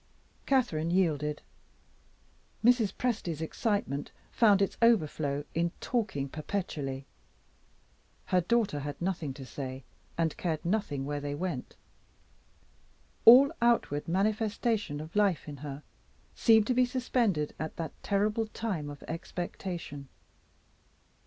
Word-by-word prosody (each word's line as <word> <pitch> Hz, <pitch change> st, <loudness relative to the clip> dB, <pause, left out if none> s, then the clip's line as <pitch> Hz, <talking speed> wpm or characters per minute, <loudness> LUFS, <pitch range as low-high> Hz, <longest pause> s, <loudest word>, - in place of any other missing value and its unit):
Catherine 230 Hz, -, +2 dB
yielded. 150 Hz, -5 st, +1 dB, 1.2 s
Mrs. 240 Hz, -4 st, +5 dB
Presty's 215 Hz, -10 st, -2 dB
excitement 160 Hz, -, -2 dB, 0.2 s
found 210 Hz, -4 st, +5 dB
its 195 Hz, -, +1 dB
overflow 155 Hz, -10 st, +2 dB
in 170 Hz, +1 st, +1 dB
talking 205 Hz, -, -1 dB
perpetually. 145 Hz, -4 st, -4 dB, 1.2 s
Her 180 Hz, -1 st, +2 dB
daughter 205 Hz, -5 st, +1 dB
had 145 Hz, 0 st, -5 dB
nothing 170 Hz, -5 st, -2 dB
to 135 Hz, -2 st, -8 dB
say, 130 Hz, +1 st, -6 dB, 0.3 s
and 165 Hz, -2 st, +1 dB
cared 160 Hz, -3 st, -2 dB
nothing 170 Hz, -8 st, -1 dB
where 145 Hz, 0 st, -3 dB
they 145 Hz, 0 st, -3 dB
went; 155 Hz, -5 st, -4 dB, 1.5 s
all 260 Hz, +5 st, +10 dB
outward 235 Hz, -11 st, +2 dB
manifestation 210 Hz, -, 0 dB
of 155 Hz, +4 st, -10 dB
life 200 Hz, -7 st, +2 dB
in 145 Hz, -1 st, -7 dB
her 140 Hz, +1 st, -7 dB, 0.5 s
seemed 220 Hz, -2 st, +5 dB
to 250 Hz, -, +1 dB
be 250 Hz, +1 st, +4 dB
suspended 240 Hz, -, 0 dB
at 160 Hz, 0 st, -4 dB
that 165 Hz, -1 st, -4 dB
terrible 210 Hz, +2 st, +1 dB
time 195 Hz, -10 st, -3 dB
of 145 Hz, -1 st, -9 dB
expectation. 165 Hz, -3 st, -5 dB
170 Hz, 115 wpm, -30 LUFS, 145-215 Hz, 1.5 s, all